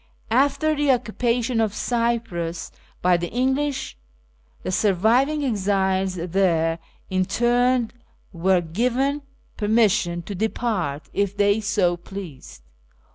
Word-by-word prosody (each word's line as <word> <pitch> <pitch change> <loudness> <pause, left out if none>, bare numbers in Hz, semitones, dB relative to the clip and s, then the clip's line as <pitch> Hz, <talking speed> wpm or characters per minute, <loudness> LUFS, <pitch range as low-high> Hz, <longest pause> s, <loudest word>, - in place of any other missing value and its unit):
After 285 +5 +2
the 290 -1 0
occupation 240 -1 0
of 215 -1 0
Cyprus 230 -9 -2 0.3
by 180 0 +4
the 175 0 -4
English, 265 +3 -1 0.7
the - - -2
surviving 225 - +2
exiles 190 -4 0
there 170 -2 +1 0.3
interned 240 +5 +1 0.4
were 180 +1 +2
given 250 - 0 0.4
per 210 - -2
mission 195 -6 +2
to 205 - -6
depart 195 -7 -2
if 200 0 -1
they 205 +1 +3
so 200 -4 +1
pleased. 155 - -10
205 Hz, 105 wpm, -23 LUFS, 180-240 Hz, 0.7 s, by